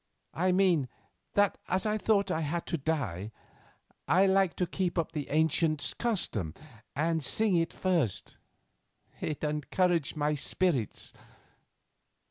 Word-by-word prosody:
I 185 +2 +1
mean, 180 -8 +3 0.5
that 205 -1 +3
as 185 +2 +1
I 215 0 0
thought 200 -3 +2
I 160 - 0
had 165 +3 -2
to 175 - -2
die, 115 - -2 0.8
I 185 +3 +5
liked 190 -2 +3
to 180 - +1
keep 180 0 -2
up 165 -1 0
the 150 -4 -4
ancient 155 0 +1
custom 120 - 0 0.4
and 160 +2 0
sing 215 - +2
it 165 -1 +1
first. 170 - -1 0.8
It 155 -1 -4
encouraged 155 +2 0
my 150 0 +1
spirits. 150 - 0
165 Hz, 125 wpm, -30 LUFS, 150-185 Hz, 0.8 s, I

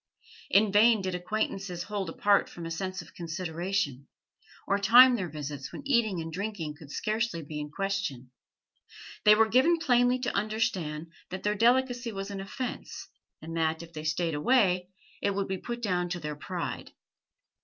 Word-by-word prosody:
In 205 0 +4
vain 215 0 +5
did 185 -1 -2
acquaintances 180 -1 -2
hold 200 -4 -3
apart 200 +4 +2
from 170 - -8
a 165 - -5
sense 185 +2 -4
of 165 - -18
consideration, 170 -4 -3 0.6
or 200 - +1
time 245 +5 +8
their 185 -6 -3
visits 145 -2 -6
when - - -8
eating 235 -9 +2
and 165 0 -5
drinking 195 -5 -4
could 150 -1 -14
scarcely 215 -1 -2
be 150 +1 -6
in 150 0 -5
question; 195 -9 -3 0.9
they 210 0 +9
were 220 +1 +4
given 260 +10 +4
plainly 245 -4 +3
to 250 -1 -3
understand 185 -8 -1 0.2
that 185 +1 -6
their 210 - +2
delicacy 240 +2 +2
was 195 0 -5
an 195 -1 -5
offence, 245 +6 -6 0.3
and 165 +1 -6
that, 160 0 0
if 170 0 -13
they 155 -1 -6
stayed 165 +1 0
away, 180 - +2 0.3
it 200 -1 0
would 200 -1 -1
be 190 -1 -3
put 240 +3 -6
down 180 -4 0
to 175 0 -3
their 150 -2 -5
pride. 145 - -5
195 Hz, 170 wpm, -29 LUFS, 165-220 Hz, 0.9 s, they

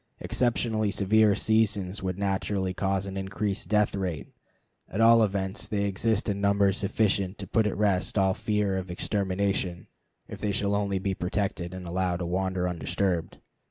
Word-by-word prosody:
Exceptionally 115 -3 0
severe 105 +1 +3
seasons 105 -3 +1
would 95 -1 -3
naturally 95 -1 -1
cause 95 0 -1
an 95 -1 -6
increased 100 +1 -3
death 105 -1 +2
rate. 90 -6 -3 0.6
At 100 - -4
all 115 0 +7
events, 95 -2 -1
they 100 -1 -1
exist 105 +3 0
in 100 -1 -1
numbers 100 -1 +3
sufficient 100 -2 0
to 100 - -6
put 110 +3 +1
at 105 - -3
rest 100 +1 +1
all 95 -1 +3
fear 105 -2 0
of 95 0 -7
extermination 95 -1 -1 0.4
if - - -9
they 105 - 0
shall 100 0 0
only 100 -1 0
be 95 +1 -1
protected 90 -1 -2
and 90 -1 -7
allowed 90 0 0
to 90 - -4
wander 95 +1 -1
undisturbed. 90 0 -1
100 Hz, 160 wpm, -27 LUFS, 95-105 Hz, 0.6 s, all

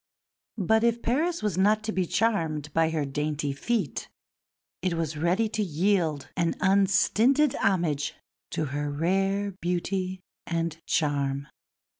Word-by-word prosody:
But 220 +3 +2
if 235 0 +1
Paris 320 +7 0
was 200 -4 0
not 210 +3 +3
to 220 - -2
be 185 -4 0
charmed 160 -11 0
by 165 0 +3
her 155 -3 -1
dainty 145 +1 -2
feet 230 - -2 0.7
it 185 -2 0
was 165 -2 -2
ready 175 +8 +1
to 215 - -2
yield 165 -5 +1
an 170 -2 +1
unstinted 210 +8 +3
homage 165 -7 0 0.3
to 155 - -2
her 145 0 -1
rare 195 +6 0
beauty 185 +2 -1 0.3
and 165 -1 -1
charm. 140 -3 0
180 Hz, 130 wpm, -27 LUFS, 155-205 Hz, 0.7 s, not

